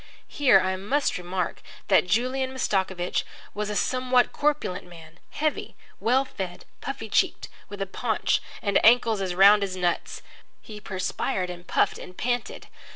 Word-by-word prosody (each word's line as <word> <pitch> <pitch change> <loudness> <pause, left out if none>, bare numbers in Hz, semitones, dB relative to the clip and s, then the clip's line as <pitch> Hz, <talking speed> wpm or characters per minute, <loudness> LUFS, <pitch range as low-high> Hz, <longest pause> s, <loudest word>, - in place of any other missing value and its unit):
Here 260 -9 +4
I 190 0 -1
must 255 +5 0
remark 180 0 -3 0.3
that - - +4
Julian 255 +7 0
Mastakovich 190 -8 -1 0.3
was 210 0 -3
a 210 - -3
somewhat 255 +2 +2
corpulent 290 -12 -1
man, 165 -1 -14
heavy, 305 0 -2 0.2
well 260 +4 +2
fed, 190 -8 -7 0.2
puffy - - -5
cheeked, - - 0 0.2
with 200 -1 -4
a - - -4
paunch 190 - 0 0.2
and 200 -2 +2
ankles 230 -2 +5
as 185 -2 -2
round 200 +2 +7
as 190 -2 -3
nuts. 175 -2 -2 0.4
He 210 -1 -11
perspired 185 -1 -2
and 175 0 -11
puffed - - +1
and 180 - -11
panted. 245 -1 -2
200 Hz, 150 wpm, -25 LUFS, 185-245 Hz, 0.4 s, round